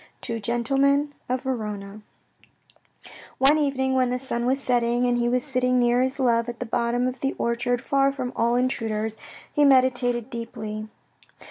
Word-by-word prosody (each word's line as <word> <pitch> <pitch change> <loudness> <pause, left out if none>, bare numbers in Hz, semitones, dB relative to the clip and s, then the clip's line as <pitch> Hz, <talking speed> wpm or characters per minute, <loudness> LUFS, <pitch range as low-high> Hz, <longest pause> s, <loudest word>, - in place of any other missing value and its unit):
Two 230 -1 -4
Gentlemen 275 +6 +1 0.2
of 255 0 -1
Verona, 210 -5 -4 1.4
One 285 +3 +5
evening 265 -2 0
when 255 -1 +2
the 250 - -1
sun 245 -2 -3
was 265 +2 +2
setting, 240 -1 +1
and 245 -1 +1
he 240 0 +1
was 250 0 +1
sitting 255 -3 +1
near 245 0 +3
his 260 +2 -1
love, 235 -2 +2
at 240 - -7
the 250 - -3
bottom 240 +1 0
of 255 0 -4
the 270 +1 -1
orchard, 240 +1 -1
far 275 0 +2
from 255 -2 -5
all 235 +1 +1
intruders, 225 -4 -1 0.4
he 295 - +3
meditated 255 -3 +3
deeply. 215 -2 -6
245 Hz, 160 wpm, -24 LUFS, 235-265 Hz, 1.4 s, One